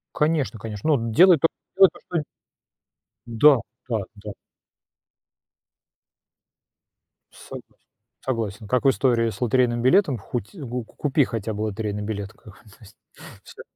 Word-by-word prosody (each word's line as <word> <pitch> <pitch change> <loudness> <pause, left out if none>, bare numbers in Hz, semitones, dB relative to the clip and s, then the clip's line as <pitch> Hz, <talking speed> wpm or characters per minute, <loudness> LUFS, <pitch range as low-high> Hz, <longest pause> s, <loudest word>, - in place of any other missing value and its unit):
Конечно 150 -6 0
конечно, 110 +8 -1
ну, 115 -3 -2
делай 180 +8 +6
то 160 - +3 0.3
то, 190 -1 +8 0.2
что 170 -4 -2 1.0
Да 130 +6 +5 0.3
да 115 -2 0 0.3
да. 105 - -5 3.0
Согласен - - -12 0.5
согласен, 110 -4 -4
как 125 +4 0
в - - +7
истории 120 -4 +2
с - - -9
лотерейным 120 0 +1
билетом, 140 0 +3
хоть 120 +4 -6
ку 125 - -6
ку - - -22
купи 145 -1 +1
хотя 110 -2 -4
бы 105 - -5
лотерейный 105 -1 -3
билет, 100 -2 -5
как 105 - -16
бы, 105 - -20
то - - -19
есть. 105 -2 -16 0.5
Всё. - - -13
120 Hz, 135 wpm, -23 LUFS, 110-140 Hz, 3.0 s, то